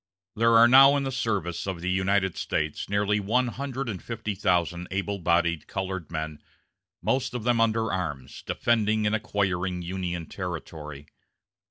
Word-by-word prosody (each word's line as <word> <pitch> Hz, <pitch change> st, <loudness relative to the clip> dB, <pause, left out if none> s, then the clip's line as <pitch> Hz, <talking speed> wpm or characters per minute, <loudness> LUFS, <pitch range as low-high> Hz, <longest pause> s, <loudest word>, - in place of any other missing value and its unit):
There 115 Hz, +1 st, +4 dB
are 115 Hz, +1 st, +8 dB
now 135 Hz, +3 st, +8 dB
in 140 Hz, -, -1 dB
the 135 Hz, -, -2 dB
service 105 Hz, -9 st, -2 dB
of 95 Hz, -3 st, -3 dB
the 90 Hz, +2 st, -3 dB
United 95 Hz, 0 st, +1 dB
States 75 Hz, -1 st, -2 dB
nearly 100 Hz, +1 st, +1 dB
one 120 Hz, +5 st, +1 dB
hundred 135 Hz, +1 st, -4 dB
and 100 Hz, -5 st, -4 dB
fifty 110 Hz, -2 st, -4 dB
thousand 90 Hz, -3 st, 0 dB
able 100 Hz, +1 st, -2 dB
bodied 85 Hz, -1 st, +1 dB
colored 95 Hz, -3 st, -4 dB
men, 80 Hz, -2 st, -4 dB, 0.6 s
most 130 Hz, +5 st, 0 dB
of 120 Hz, -, -3 dB
them 120 Hz, -1 st, +2 dB
under 110 Hz, -1 st, +1 dB
arms, 75 Hz, -8 st, -4 dB
defending 110 Hz, -2 st, +1 dB
and 105 Hz, +1 st, +2 dB
acquiring 95 Hz, -5 st, -1 dB
Union 90 Hz, -1 st, -3 dB
territory. 80 Hz, -5 st, -7 dB
100 Hz, 155 wpm, -26 LUFS, 90-115 Hz, 0.6 s, are